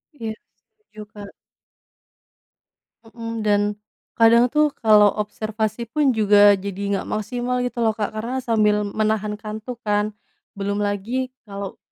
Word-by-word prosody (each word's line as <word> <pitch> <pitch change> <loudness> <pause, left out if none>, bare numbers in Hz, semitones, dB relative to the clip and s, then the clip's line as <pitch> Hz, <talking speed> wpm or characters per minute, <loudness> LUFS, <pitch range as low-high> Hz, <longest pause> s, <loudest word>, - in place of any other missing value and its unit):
Iya 225 -5 -5 0.2
setuju 430 - -17
Kak. 205 -1 -9 1.8
Mhm, 230 -1 -6
dan, 205 -1 +3 0.6
kadang 235 +2 +5
tuh 300 0 +2
kalau 210 -2 +6
observasi 215 +2 -3
pun 285 +4 +1
juga 205 -3 +5
jadi 200 +1 -3
nggak - - -9
maksimal 245 +3 -2
gitu 245 -1 -3
loh 220 - +2
Kak 210 -1 -2
karena 250 +4 -3
sambil 215 -3 +2
menahan 210 0 -1
kantuk 220 +3 -7
kan, 210 0 0 0.4
belum 200 +1 -2
lagi 220 +6 -2 0.2
kalau. 200 -2 -7
215 Hz, 125 wpm, -22 LUFS, 205-235 Hz, 1.8 s, kalau